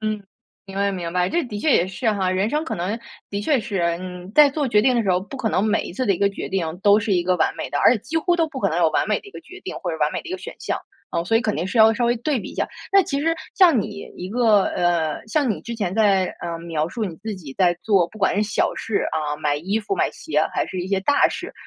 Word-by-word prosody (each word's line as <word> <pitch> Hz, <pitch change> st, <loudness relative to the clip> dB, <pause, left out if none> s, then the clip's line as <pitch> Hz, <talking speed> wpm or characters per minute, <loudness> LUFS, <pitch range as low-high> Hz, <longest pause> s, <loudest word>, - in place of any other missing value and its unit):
嗯， 215 Hz, -1 st, -2 dB, 0.4 s
明 195 Hz, -1 st, -9 dB
白， 200 Hz, 0 st, +1 dB
明 175 Hz, -3 st, -4 dB
白， 180 Hz, 0 st, +1 dB
这 345 Hz, -, 0 dB
的 215 Hz, -5 st, -6 dB
确 300 Hz, +7 st, +2 dB
也 175 Hz, -, +4 dB
是 215 Hz, +4 st, -1 dB
哈。 190 Hz, -2 st, 0 dB
人 190 Hz, +4 st, 0 dB
生 300 Hz, +3 st, 0 dB
可 225 Hz, -, -3 dB
能 195 Hz, +5 st, -2 dB, 0.3 s
的 200 Hz, -, -2 dB
确 275 Hz, +6 st, +2 dB
是 215 Hz, -4 st, -3 dB, 0.2 s
嗯， 180 Hz, 0 st, -8 dB
在 300 Hz, -2 st, +7 dB
做 285 Hz, -1 st, -1 dB
决 210 Hz, -3 st, +4 dB
定 255 Hz, +1 st, +3 dB
的 235 Hz, -, +2 dB
时 195 Hz, -, 0 dB
候， 180 Hz, -, +3 dB
不 200 Hz, +8 st, -9 dB
可 230 Hz, -3 st, -1 dB
能 195 Hz, -, +1 dB
每 215 Hz, -, +1 dB
一 -, -, -7 dB
次 255 Hz, +8 st, -2 dB
的 200 Hz, -, +3 dB
一 175 Hz, -, -3 dB
个 200 Hz, -, +3 dB
决 200 Hz, -, -6 dB
定 175 Hz, -3 st, -2 dB
都 205 Hz, 0 st, +5 dB
是 210 Hz, -2 st, -1 dB
一 175 Hz, -, +2 dB
个 185 Hz, +1 st, +2 dB
完 160 Hz, -, +1 dB
美 -, -, -5 dB
的， 145 Hz, -, -1 dB
而 -, -, +6 dB
且 240 Hz, -, 0 dB
几 315 Hz, +10 st, -5 dB
乎 345 Hz, +2 st, +2 dB
都 330 Hz, -, +2 dB
不 270 Hz, -4 st, -7 dB
可 -, -, +2 dB
能 160 Hz, -, -1 dB
有 170 Hz, -2 st, +4 dB
完 155 Hz, -, 0 dB
美 210 Hz, -, +2 dB
的 -, -, -17 dB
一 -, -, -11 dB
个 -, -, -10 dB
决 365 Hz, +2 st, -13 dB
定 380 Hz, -, -6 dB
或 180 Hz, -, -3 dB
者 160 Hz, -, -3 dB
完 150 Hz, 0 st, +1 dB
美 -, -, -2 dB
的 -, -, -10 dB
一 -, -, -5 dB
个 375 Hz, -, -3 dB
选 -, -, -8 dB
项。 -, -, -2 dB, 0.3 s
嗯， 170 Hz, -, -1 dB
所 225 Hz, +5 st, +2 dB
以 -, -, +3 dB
肯 215 Hz, -3 st, -1 dB
定 165 Hz, -, -2 dB
是 195 Hz, +5 st, -2 dB
要 220 Hz, 0 st, +7 dB
稍 240 Hz, -, 0 dB
微 240 Hz, +1 st, +2 dB
对 270 Hz, +4 st, -1 dB
比 -, -, -8 dB
一 -, -, -12 dB
下。 -, -, -1 dB, 0.2 s
那 395 Hz, -, +7 dB
其 280 Hz, -5 st, -2 dB
实 330 Hz, +2 st, +1 dB, 0.2 s
像 340 Hz, -, +5 dB
你 205 Hz, 0 st, -7 dB
一 180 Hz, -, -6 dB
个 220 Hz, -3 st, +3 dB
呃， 170 Hz, -3 st, 0 dB
像 285 Hz, +1 st, +1 dB
你 215 Hz, -, -1 dB
之 235 Hz, -1 st, -5 dB
前 190 Hz, -5 st, -2 dB
在 200 Hz, -4 st, +4 dB, 0.2 s
呃， 170 Hz, -1 st, -4 dB
描 165 Hz, -2 st, -2 dB
述 220 Hz, +5 st, -3 dB
你 180 Hz, -5 st, -5 dB
自 215 Hz, +3 st, -5 dB
己 145 Hz, -7 st, -10 dB
在 180 Hz, -2 st, +4 dB
做， 195 Hz, -6 st, +3 dB
不 215 Hz, -, -14 dB
管 190 Hz, -, +2 dB
是 210 Hz, -, +3 dB
小 215 Hz, -, 0 dB
事 220 Hz, -, -1 dB
啊， 150 Hz, -2 st, -1 dB
买 150 Hz, -1 st, 0 dB
衣 190 Hz, +8 st, -1 dB
服 225 Hz, -, -2 dB
买 -, -, +1 dB
鞋 -, -, -1 dB
还 -, -, 0 dB
是 185 Hz, -, -4 dB
一 180 Hz, -, -5 dB
些 195 Hz, -1 st, +1 dB
大 285 Hz, +9 st, +4 dB
事， -, -, -6 dB
205 Hz, 330 characters per minute, -22 LUFS, 180-240 Hz, 0.4 s, 在